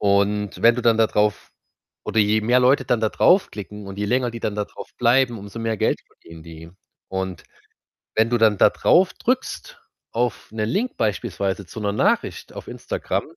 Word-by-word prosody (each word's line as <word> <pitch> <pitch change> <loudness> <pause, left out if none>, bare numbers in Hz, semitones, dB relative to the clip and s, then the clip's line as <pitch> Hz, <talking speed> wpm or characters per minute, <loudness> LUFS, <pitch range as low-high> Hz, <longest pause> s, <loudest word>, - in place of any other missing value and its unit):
Und 100 0 +1
wenn 115 0 +6
du 125 - -3
dann 115 -1 +3
da 110 - +5
drauf 105 -1 0 0.5
oder 110 - -2
je 105 +1 +3
mehr 120 +4 +3
Leute 130 +1 +3
dann 120 -1 +1
da 110 - +2
drauf 185 - +3
klicken 105 0 -8
und 95 +1 -8
je 105 - -1
länger 125 +1 +1
die 115 0 -8
dann 105 - -2
da 105 - -1
drauf - - -11
bleiben, 120 -1 +3
umso 100 +3 -9
mehr 115 -1 -2
Geld - - 0
verdienen 80 -1 -15
die 80 0 -11 0.4
und 95 -2 -4 0.7
wenn 110 +1 +3
du 120 - +2
dann 110 -3 +3
da - - +6
drauf 185 +1 +3
drückst 265 - -3 0.3
auf 120 -2 -2
'ne 110 -1 -2
Link 220 - -2
beispielsweise 100 -2 -2
zu 110 - -9
'ner 100 -1 0
Nachricht - - 0
auf - - -9
Instagram, - - -3
110 Hz, 195 wpm, -22 LUFS, 100-120 Hz, 0.7 s, wenn